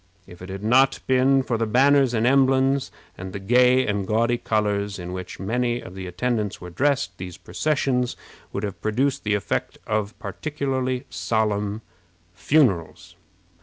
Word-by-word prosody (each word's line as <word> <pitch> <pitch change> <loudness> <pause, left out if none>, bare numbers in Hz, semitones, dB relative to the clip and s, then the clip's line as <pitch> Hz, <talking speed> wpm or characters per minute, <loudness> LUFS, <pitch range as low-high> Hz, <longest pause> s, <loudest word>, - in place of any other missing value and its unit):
If 90 0 -14
it 90 - -9
had 95 +1 -6
not 130 +5 +4
been 130 +1 +3
for 120 -3 -2
the 115 - 0
banners 135 +2 +4
and 115 +1 +1
emblems, 135 +1 +3 0.3
and 95 0 -7
the 100 - -4
gay 125 +5 +4
and 100 -2 -1
gaudy 115 +2 +1
colors 105 -2 -1
in 90 0 -6
which 95 -1 -7
many 120 +4 -1
of 95 - -10
the 95 -1 -7
attendants 105 +3 -2
were 90 0 -9
dressed, 140 +7 0
these 90 -2 -7
processions 135 -5 -1 0.3
would 100 - -4
have 100 -3 -5
produced 130 +6 0
the 105 -1 +1
effect 100 -4 -2
of 105 0 -2
particularly 135 -4 -3
solemn 105 -1 -1 0.5
funerals. 95 - +1
115 Hz, 155 wpm, -23 LUFS, 100-130 Hz, 0.5 s, not